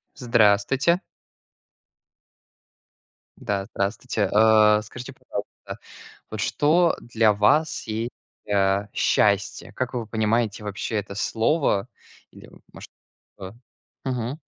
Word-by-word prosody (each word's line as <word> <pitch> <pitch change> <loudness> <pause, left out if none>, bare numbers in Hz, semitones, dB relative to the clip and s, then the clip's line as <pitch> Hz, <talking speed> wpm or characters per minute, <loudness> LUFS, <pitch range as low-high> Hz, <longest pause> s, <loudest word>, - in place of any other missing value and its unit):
Здравствуйте. 120 - +2 2.4
Да, 100 -1 -3
здравствуйте. 100 +1 -2
А, 105 0 +5
скажите, 120 +3 -10
пожалуйста, - - -8 0.5
вот 110 - -5
что 160 - +2
для 115 -2 +2
вас 125 +10 +2
есть, 110 +2 -3 0.4
а, 100 0 +2
счастье? 100 -1 +1
Как 130 0 -3
вы 120 -3 -4
понимаете 110 0 0
вообще 105 +2 -4
это 100 -1 -5
слово? 110 +1 0 0.4
Или, - - -15 0.2
может, - - -12 0.5
то, 95 0 -9 0.5
мгм. 125 +2 -3
110 Hz, 95 wpm, -24 LUFS, 100-125 Hz, 2.4 s, А